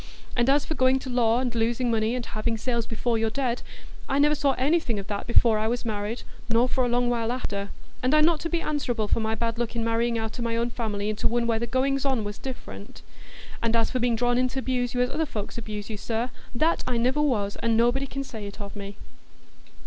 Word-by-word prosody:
And 240 +1 +3
as 285 +1 +4
for - - -2
going 260 -2 +4
to 260 -1 -6
law 235 -1 +3
and 250 -2 -1
losing 235 +1 +1
money, 225 +1 +1
and 250 -2 -3
having 225 +1 -2
sales 235 0 -1
before 230 0 0
you're 225 0 +1
dead, 250 0 -1 0.5
I 275 - +2
never 295 +1 +5
saw 280 -2 +2
anything 265 -4 +1
o' - - -4
that 200 +1 -4
before 235 -2 +4
I 215 - +1
was 240 +1 -1
married, 215 +1 -3 0.3
nor 230 +2 +4
for 255 0 +1
a - - +2
long 245 +1 +2
while 235 -1 0
after. 200 -5 -3 0.3
And 255 +4 +3
I'm 305 0 +6
not 330 -1 +3
to 330 - -3
be 340 -1 0
answerable 245 -8 -1
for - - +2
my 220 0 0
bad 230 +1 -2
luck 235 0 -2
i' - - 0
marrying 230 +1 +1
out 220 +2 -4
o' - - -2
my 230 -1 0
own 235 +1 0
family 210 -4 -2
into 215 0 0
one 235 0 +1
where 230 -1 +1
the 235 - -2
goings 270 +3 +1
on 265 -5 +1
was 205 0 -5
different. 100 - -8 0.6
And 230 0 +1
as 230 -1 +2
for 255 - 0
being 240 -1 +2
drawn 245 +1 +2
in 255 - +3
t' 265 +1 -3
abuse 250 -1 -1
you 245 - +2
as 250 - +1
other 315 +1 0
folks 215 -2 -5
abuse 210 -2 -5
you, 220 - -5
sir, 230 +3 -2 0.2
that 320 +7 +2
I 245 - +1
niver 255 +5 +2
was, 210 -9 +1
and 230 -1 +1
nobody 240 +4 +2
can 275 +1 -4
say 220 -6 -7
it 200 - -10
of 200 -1 -7
me." 200 0 -7
235 Hz, 250 wpm, -26 LUFS, 225-255 Hz, 0.6 s, I'm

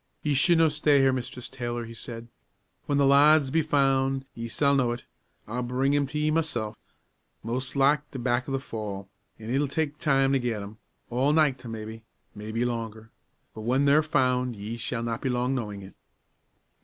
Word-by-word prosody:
"Ye 150 - +1
should 165 +5 +4
no 165 0 +5
stay 150 -1 +3
here, 135 -1 +4
Mistress 125 -1 -5
Taylor," 120 -2 -4
he 115 - -9
said. 115 0 -8 0.6
"When 145 - +1
the 140 - +4
lads 140 0 +5
be 160 +2 +3
found 135 -2 +1
ye 115 0 -5
s'all 140 +5 +2
know 130 -4 +2
it; 120 - -8 0.4
I'll 120 +3 -3
bring 130 +3 0
'em 145 -1 +1
to 150 - -5
ye 150 +1 +1
mysel'. 120 -10 -1 0.7
Mos' 125 +5 -3
like 145 +2 +3
they're 135 - -7
back 120 +2 0
o' - - -4
the 135 - +1
fall, 105 -6 -6 0.3
an' 110 +1 -7
it'll 140 +3 +1
tak' 150 +1 -2
time 135 -4 +3
to 135 - +3
get 115 -4 -2
'em 105 +2 -10 0.3
all 130 +5 +2
nicht 140 -6 +2
maybe, 110 0 -7 0.3
maybe 110 +3 -3
longer; 115 -2 -4 0.4
but 110 - -8
when 130 +5 +1
they're 145 +2 +5
found, 125 -5 +1
ye 105 +3 -5
s'all 115 0 -3
not 115 -1 -3
be 130 - -1
long 125 +1 0
knowin' 105 -6 -4
it." 95 - -12
130 Hz, 190 wpm, -27 LUFS, 115-140 Hz, 0.7 s, no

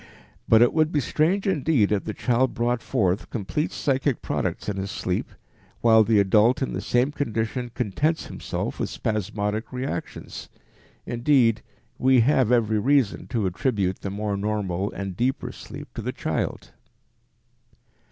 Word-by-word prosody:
But 110 +1 +7
it 120 - +3
would 155 0 +2
be 150 - +2
strange 165 +8 +1
indeed 150 - +2
if 105 -2 0
the 110 - -3
child 125 +1 +1
brought 120 0 0
forth 100 -6 0
complete 120 - -2
psychic 135 -2 0
products - - -2
in 100 -2 -2
sleep, 90 -2 -2 0.5
while 110 -1 +6
the 110 -1 +3
adult 105 +6 +4
in - - -3
the - - -3
same 125 +4 +1
condition 120 -2 -2
contents 145 - 0
himself - - -4
with - - -1
spasmodic 105 0 -2
reactions. 125 -8 -5 0.6
Indeed, 120 -2 +2 0.4
we 130 -1 +5
have 130 -1 +3
every 110 -3 +3
reason 135 -1 +1
to 115 -5 -1
attribute 95 0 0
the 100 - -3
more 100 +1 -2
normal 100 -2 -2
and 95 -2 -5
deeper 125 +6 -1
sleep - - -10
to - - -5
the - - -3
child. - - -3
115 Hz, 145 wpm, -24 LUFS, 105-130 Hz, 0.6 s, But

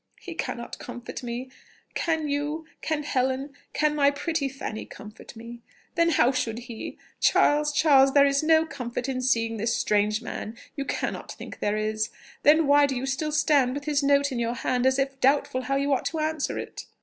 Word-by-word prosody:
"He 355 - -8
cannot 235 -7 -5
comfort 245 -1 -7
me!... 245 +1 -5 0.4
Can 320 -2 0
you, 295 +3 -2 0.2
can 310 -2 -1
Helen, 265 0 -1 0.2
can 300 0 +1
my 285 -2 +4
pretty 285 0 -2
Fanny 260 -5 -5
comfort 210 +3 -12
me?... 235 +1 -10 0.3
Then 335 -1 +3
how 260 -6 +4
should 250 -4 -2
he?... 235 -2 -7 0.2
Charles, 295 0 +3
Charles, 285 -3 +5
there 280 0 +7
is 280 0 +2
no 320 0 +4
comfort 250 -4 -5
in 260 -1 -2
seeing 230 -3 +1
this 230 +2 0
strange 210 +1 +1
man; 230 -1 -6 0.2
you 275 - -3
cannot - - -3
think - - -10
there 205 +1 0
is: 215 0 -1 0.3
then 315 +2 +5
why 285 0 +5
do 270 - -2
you 250 +2 -2
still 275 +3 -2
stand 290 -4 +3
with 285 0 -5
his 295 -1 +1
note 280 0 +3
in 250 - -2
your 235 +1 -1
hand 250 +1 +1
as 265 0 +3
if 270 -1 -1
doubtful 275 0 +2
how 275 +2 -1
you 280 +1 +1
ought 265 - -1
to 325 - -2
answer 310 -1 -1
it?" - - -7
275 Hz, 195 wpm, -26 LUFS, 240-295 Hz, 0.4 s, there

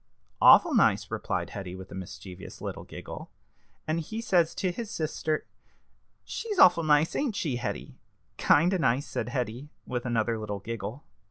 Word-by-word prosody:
"Awful - - +8
nice," - - +3
replied - - -2
Hetty, 95 -3 -6
with 95 0 -10
a - - -7
mischievous 95 0 -9
little - - -5
giggle. - - -9 0.6
"And 155 +1 0
he 215 +8 -5
says 180 -8 +2
to 185 - 0
his 225 +4 -6
sister 155 -2 -2 0.8
she's 430 -3 -4
awful 180 - +7
nice, 150 +1 +3
ain't 270 -8 0
she, 145 -11 -1
Hetty?" 120 - -5 0.4
"Kind 170 +6 +4
of 185 - 0
nice," 130 +1 +2
said - - -3
Hetty, 125 +2 -3 0.2
with 125 0 -3
another 115 -1 0
little 105 -2 -4
giggle. 115 +5 -6
145 Hz, 160 wpm, -28 LUFS, 110-170 Hz, 0.8 s, Awful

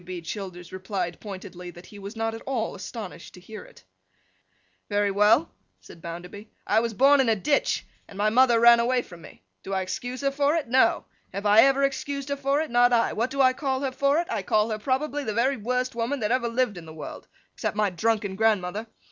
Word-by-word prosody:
W. - - -19
B. 180 0 -6
Childers 180 -3 -7
replied 185 -2 -4
pointedly, 185 -3 -8
that 175 0 -13
he 205 - -13
was 200 +3 -8
not 225 0 -2
at 225 - -8
all 245 -5 -2
astonished 200 +1 -8
to - - -12
hear 210 +3 -10
it. - - -18 1.1
'Very 205 0 +1
well,' 215 +10 +3 0.3
said 165 - -15
Bounderby. 180 +6 -8 0.2
'I 215 - +3
was 230 -1 -2
born 275 +3 +5
in 255 - +1
a 225 - +3
ditch, 285 +8 0 0.2
and 195 - -13
my 210 +1 +2
mother 240 0 +5
ran 235 0 +7
away 245 +1 +1
from 175 -1 -13
me. - - -15 0.2
Do 195 - -6
I 190 - 0
excuse 245 +7 -5
her 275 0 +1
for 285 +2 +1
it? 315 -5 -1
No. 255 +3 +3 0.3
Have 200 +2 -5
I 210 +2 +7
ever 275 0 +3
excused 280 0 -2
her 280 - 0
for 280 +1 0
it? 315 - -5
Not 245 +1 +4
I. 235 -1 +2
What 230 +4 -1
do 275 +1 0
I 255 -1 +5
call 265 -1 -2
her 270 -2 -1
for 280 +2 +1
it? 340 - +1
I 220 - -1
call 215 +3 +1
her 215 - -3
probably 280 +5 -1
the 215 -5 -3
very 255 +3 +2
worst 250 +4 -2
woman 235 +4 -2
that 210 +1 0
ever 250 -1 +1
lived 230 -5 -1
in 165 - -13
the 160 - -10
world, 155 - -9 0.3
except - - -3
my 210 -2 +2
drunken 205 +1 -1
grandmother. 210 0 0
225 Hz, 230 wpm, -25 LUFS, 200-260 Hz, 1.1 s, ran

